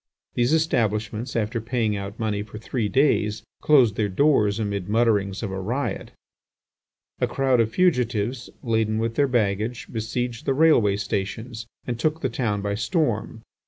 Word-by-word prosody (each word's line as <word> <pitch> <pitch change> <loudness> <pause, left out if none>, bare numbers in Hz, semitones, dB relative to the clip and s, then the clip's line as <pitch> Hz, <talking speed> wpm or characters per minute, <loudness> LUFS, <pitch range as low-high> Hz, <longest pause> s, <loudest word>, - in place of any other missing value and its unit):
These 120 +2 +1
establishments, 115 -6 0
after 115 +1 -1
paying 115 -2 0
out 100 +1 -6
money 105 -2 -1
for 105 +1 -9
three 110 0 -2
days, 110 -4 +2 0.2
closed 125 -9 +4
their 105 -2 +1
doors 105 -2 +3
amid 100 -3 -3
mutterings 105 -3 +1
of 100 - -3
a 95 - -3
riot. 125 +9 -3 1.1
A - - +2
crowd 130 -2 +1
of 115 -1 +3
fugitives, 125 - 0
laden 110 -2 +1
with 115 +1 -1
their 140 +3 +2
baggage, 110 -1 -1
besieged 115 +2 -3
the 135 - +2
railway 135 -10 +4
stations 110 +3 -4 0.2
and 120 -1 -3
took 155 +4 0
the 130 - 0
town 110 -4 -1
by 100 0 -1
storm. 115 - -1
115 Hz, 155 wpm, -24 LUFS, 105-125 Hz, 1.1 s, closed